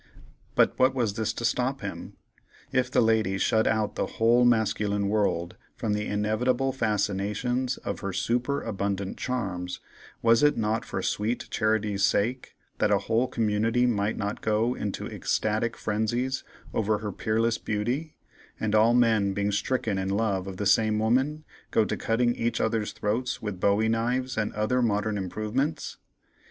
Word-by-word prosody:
But - - +3 0.2
was 115 -6 0
this 110 0 -1
to 120 - -4
stop 125 +3 0
him? 100 -1 -7 0.5
If 130 -1 +1
the 125 - +3
lady 110 -3 +2
shut 110 +3 +2
out 110 -1 +1
the - - -2
whole 120 +2 +4
masculine 105 -3 +1
world 90 -4 0 0.2
from 110 -3 -1
the 105 0 -2
inevitable 120 +6 +1
fascinations 115 +2 -1
of - - -5
her 100 - -3
superabundant 100 -2 -1
charms, 90 -8 -3 0.4
was 115 0 +5
it 150 0 +4
not 110 0 0
for - - -4
sweet 110 +4 -1
charity's 110 -2 0
sake, 110 +5 0 0.2
that - - +3
a 100 - +4
whole 115 +5 +1
community 115 +2 +1
might 105 -3 0
not 100 0 -3
go 110 +3 +1
into 105 -5 -4
ecstatic 110 +2 -1
frenzies 120 +5 -1 0.3
over 110 -1 +1
her 105 -1 -4
peerless 115 +3 0
beauty, 120 +9 -2 0.4
and 110 -1 -1
all 110 +2 +5
men, 110 -5 +3
being 100 +1 0
stricken 110 0 -1
in 95 0 -2
love 100 -2 0
of 95 -1 -6
the 105 - -2
same 105 +2 +3
woman, 130 +8 +1 0.3
go 110 - +3
to - - -2
cutting 120 +1 +1
each 115 0 -1
other's 110 -1 0
throats 120 +5 -2
with 105 -4 -5
bowie 100 +3 +3
knives 120 +3 0
and 110 -1 -1
other 110 +4 +1
modern 105 -2 +1
improvements! 110 - -2
110 Hz, 155 wpm, -27 LUFS, 105-120 Hz, 0.5 s, was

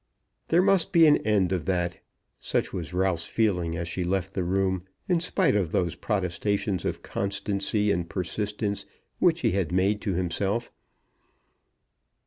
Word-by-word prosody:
There 170 +3 +4
must 195 -3 +3
be 165 -1 +7
an 150 -1 +6
end 100 -4 +1
of 90 -5 -1
that. 90 -2 -1 0.4
Such - - -1
was 85 -3 -4
Ralph's 90 -2 0
feeling 90 -7 0
as 85 0 -3
she 90 +2 -2
left 95 +1 -1
the 95 - -1
room, 95 0 0 0.3
in 180 -2 +3
spite 180 - +1
of 95 -6 0
those 85 -3 +1
protestations 100 0 -1
of - - -3
constancy 100 +1 -1
and 85 -2 -1
persistence 100 +3 -3 0.3
which - - +3
he - - +2
had 90 -3 -1
made 95 +3 +2
to 100 -4 -1
himself. 95 +6 -1
95 Hz, 150 wpm, -27 LUFS, 90-105 Hz, 0.4 s, be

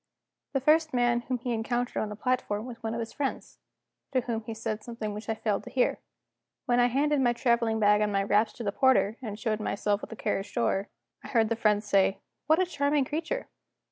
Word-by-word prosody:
The 270 - +2
first 310 +1 +3
man 240 -1 +3
whom 250 +1 -3
he 245 0 -3
encountered 240 +2 -1
on 215 - -2
the 210 - -6
platform 230 -3 -1
was 235 -2 -9
one 225 0 -3
of - - -3
his 230 -1 -5
friends; 280 -2 -4 0.5
to 255 - +3
whom 230 -2 -3
he 225 - -5
said 220 -1 -4
something 230 -3 -5
which 210 +2 -7
I 225 - +1
failed 210 -2 -1
to - - -7
hear. 255 - +1 0.7
When 245 0 +2
I 245 - +5
handed 285 +3 +2
my 240 -2 +3
traveling 235 -2 +1
bag 210 0 +4
and 210 -1 +1
my 195 0 +1
wraps 210 +2 +2
to 240 - -7
the 200 - 0
porter, 245 -2 +3
and 215 -4 -6
showed 215 -1 -1
myself 205 0 -1
at - - -8
the 225 - -7
carriage 195 -2 -3
door, 205 -5 0 0.3
I - - -8
heard 225 -2 +2
the 230 - +1
friend 210 -2 +2
say: 200 -2 +3 0.3
"What 315 +2 +4
a 370 - +3
charming 285 -4 +1
creature!" 315 +4 -3
230 Hz, 225 wpm, -28 LUFS, 215-255 Hz, 0.7 s, I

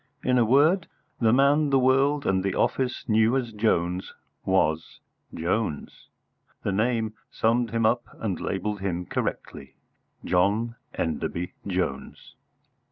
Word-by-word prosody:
In 125 -1 +3
a 120 - +4
word, 150 - +4 0.3
the 115 -2 +3
man 140 +4 +4
the 135 - +4
world 135 +3 +3
and 95 -1 +1
the 95 -1 -1
office 125 -2 -1
knew 110 +3 +3
as 120 -3 -3
Jones 90 -4 0 0.3
was 80 -4 0 0.3
Jones. 85 -1 -3 0.6
The - - 0
name 110 +1 0 0.2
summed 115 +1 +1
him 115 0 0
up 120 +2 +2
and 100 -6 -3
labelled 105 +1 -3
him 90 -2 -3
correctly - - -4 0.5
John 105 +6 +1 0.2
Enderby 85 +2 -3
Jones. 90 -8 -4
110 Hz, 125 wpm, -26 LUFS, 95-125 Hz, 0.6 s, a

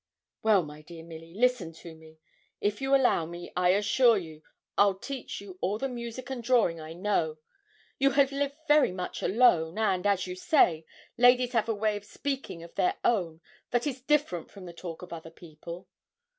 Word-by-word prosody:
'Well, 210 -4 +4
my 150 0 -10
dear 165 +1 -11
Milly, 165 0 -11
listen 235 -7 +1
to 165 +1 -11
me: 160 0 -16 0.4
if 205 +4 -1
you 270 +1 +3
allow 245 -11 +3
me, 175 +1 -9
I 180 0 +3
assure 210 +5 +4
you, 160 -4 -7 0.3
I'll 200 -1 +4
teach 270 +5 -6
you 190 -2 -11
all 200 +3 0
the 270 - -2
music 245 +1 -6
and 255 -2 -4
drawing 230 -9 +2
I 155 +1 -8
know. 170 -4 -1 0.6
You 275 0 +5
have 275 -1 +5
lived 280 0 -2
very 295 -8 +5
much 180 0 -5
alone; 185 -7 +3
and, 205 -3 +1
as 200 -2 +1
you 180 0 -5
say, 170 - +2 0.3
ladies 245 0 +5
have 230 -1 +1
a 225 - +1
way 210 0 0
of 205 - -11
speaking 265 -9 -5
of 170 - -13
their 365 +2 +1
own 170 -8 +1 0.3
that 245 +1 0
is 265 -3 -3
different 275 - 0
from 195 -2 -12
the 175 - -9
talk 170 0 -8
of 180 - -9
other 165 -1 -8
people.' 170 +1 -11
200 Hz, 190 wpm, -28 LUFS, 170-245 Hz, 0.6 s, You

